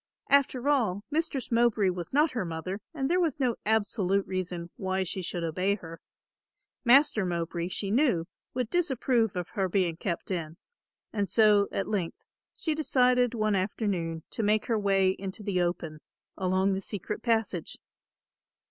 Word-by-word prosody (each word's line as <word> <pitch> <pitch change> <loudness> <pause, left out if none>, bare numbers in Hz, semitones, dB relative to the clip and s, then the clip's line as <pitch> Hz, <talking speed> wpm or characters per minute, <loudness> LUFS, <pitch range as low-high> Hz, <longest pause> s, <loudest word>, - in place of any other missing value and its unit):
After 275 -2 +3
all, 220 -9 +2
Mistress 295 -5 -1
Mowbray 230 -4 +3
was 175 -2 -6
not 295 +2 +3
her 230 -5 -2
mother 180 +4 -4
and 275 -5 -2
there 355 +4 +2
was 325 -6 0
no 250 -4 +1
absolute 200 -3 +1
reason 180 -2 -4
why 190 0 -1
she 185 +1 -4
should 175 -1 -4
obey 185 +5 0
her. 165 -4 -10 0.8
Master 260 -3 +5
Mowbray, 170 -1 -2
she 195 +2 -3
knew, 235 - +2 0.3
would 250 -3 -2
disapprove 260 - +1
of 180 -1 -3
her 190 -2 -1
being 175 -3 +1
kept 175 +1 -4
in, 165 -3 -3 0.6
and 205 -3 -1
so 210 -3 +5
at 195 - -2
length 190 -6 -3 0.3
she 320 - -1
decided 250 -5 +3
one 215 -1 +1
afternoon 185 -4 -1
to - - -3
make 215 0 +2
her 225 -2 +1
way 195 -2 +3
into 190 +2 -6
the 195 -3 0
open 170 -3 -2 0.4
along 190 +1 +1
the 190 - -2
secret 205 +2 -5
passage. 225 -8 -1
200 Hz, 155 wpm, -28 LUFS, 180-240 Hz, 0.8 s, Master